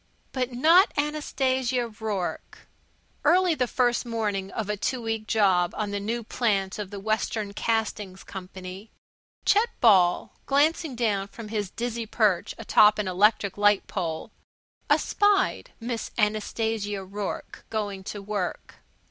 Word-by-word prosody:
But 255 -1 -2
not 325 +10 +5
Anastasia 260 -4 0
Rourke. 210 -4 -5 0.6
Early 355 +3 +4
the 255 -5 0
first 245 0 +1
morning 210 -5 -2
of 210 +1 -4
a 210 - -1
two 250 +5 -2
weeks' 225 -2 -3
job 190 -5 +3
on 210 -1 -2
the 205 - -2
new 230 +4 -3
plant 205 -4 -1
of 205 -2 -4
the 200 0 -7
Western 215 0 -1
Castings 210 -4 -2
Company 190 +2 -9 0.6
Chet 435 +4 +4
Ball, 185 -6 +4
glancing 295 0 +2
down 210 -5 0
from 215 +1 -10
his 210 -3 -2
dizzy 235 +1 -4
perch 210 -5 +1
atop 210 -1 +5
an 210 -2 -1
electric 200 +1 +2
light 205 -1 +4
pole, 165 -5 -4 0.6
espied 410 -1 +2
Miss 235 -1 -4
Anastasia 210 -1 -1
Rourke 200 +1 -6
going 205 -3 -3
to 205 0 -6
work. 200 -3 -4
215 Hz, 130 wpm, -26 LUFS, 200-240 Hz, 0.6 s, not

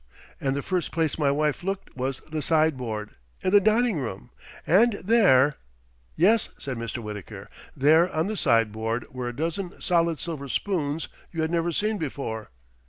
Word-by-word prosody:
and 135 -1 0
the 140 - -2
first 180 -2 -1
place 160 -2 0
my 145 -2 +3
wife 150 +1 0
looked 195 +2 -4
was 130 +1 -3
the 155 0 -5
sideboard, 130 -10 0 0.3
in 185 - +1
the 205 0 +7
dining 220 -3 +2
room, 115 -8 -6 0.3
and 220 +8 +5
there 185 - +4 0.3
" - - -36 0.3
"Yes," 210 +7 +3
said 135 -2 -5
Mr. 115 +1 -5
Wittaker. 105 -3 -7 0.3
"There, 160 +6 +5
on 160 -1 0
the 215 +2 -2
sideboard, 115 - +1
were 125 -1 -4
a 120 - -5
dozen 170 +5 -3
solid 170 -3 +1
silver 155 -5 -5
spoons 160 -3 -1 0.2
you 165 -2 -2
had 160 - -1
never 170 0 +1
seen 210 +5 0
before." 130 -7 -4
155 Hz, 170 wpm, -26 LUFS, 130-180 Hz, 0.3 s, the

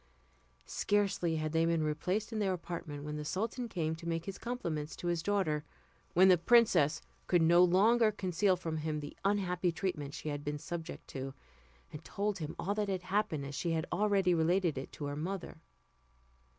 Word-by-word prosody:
Scarcely 195 -5 +1
had 155 -1 -2
they 165 +1 +2
been 165 -1 +2
replaced 180 +9 -1
in 220 - -1
their 195 -3 +1
apartment, 165 -5 -6
when 150 0 -4
the 150 - -4
sultan 225 - -2
came 160 -5 -1
to 165 - -8
make 165 0 -2
his 195 - -6
compliments 170 -11 -3
to - - -9
his 170 -1 0
daughter, 165 -6 0 0.5
when 185 +2 +7
the 180 -2 +6
princess 170 -7 +4 0.2
could 175 -2 +4
no 170 +2 +6
longer 215 +6 +5
conceal 190 -1 +1
from 165 -3 -4
him 155 0 -2
the 145 0 -8
unhappy 185 -3 +1
treatment 155 -5 -3
she 155 - -5
had 145 0 -4
been 150 0 -2
subject 170 +2 -6
to, 135 0 -5 0.6
and 150 +1 -8
told 200 +3 -2
him 155 -2 -5
all 195 +4 -1
that 210 -1 -1
had 185 -2 -2
happened 185 -7 0
as 140 - -6
she 165 +4 -1
had 160 0 0
already 200 -3 +3
related 170 0 +2
it 135 0 -6
to 145 - -5
her 145 0 -3
mother. 170 +1 -5
170 Hz, 190 wpm, -33 LUFS, 155-195 Hz, 0.6 s, when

